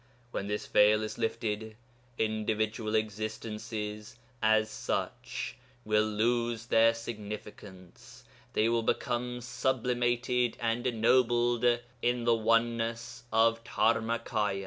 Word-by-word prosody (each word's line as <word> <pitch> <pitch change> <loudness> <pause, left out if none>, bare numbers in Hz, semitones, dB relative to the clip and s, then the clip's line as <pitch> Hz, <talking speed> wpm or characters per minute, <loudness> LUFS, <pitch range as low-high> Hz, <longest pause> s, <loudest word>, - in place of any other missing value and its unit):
When 100 - -3
this 105 0 -2
veil 105 +1 +4
is 110 - -5
lifted, 110 -1 -2 0.4
individual 110 0 -1
existences 110 0 -4 0.3
as 110 0 +4
such 110 - -4 0.3
will 105 0 +3
lose 115 +1 0
their 115 0 +4
significance; 105 -4 -9 0.3
they 110 - +3
will 115 0 +2
become 125 +1 -1
sublimated 125 -1 0
and 120 +2 0
ennobled 120 0 +3 0.4
in 120 0 +1
the 120 0 +4
oneness 115 +1 0
of 115 +1 +3
Dharmakâya. 110 -3 0
115 Hz, 100 wpm, -30 LUFS, 110-120 Hz, 0.4 s, veil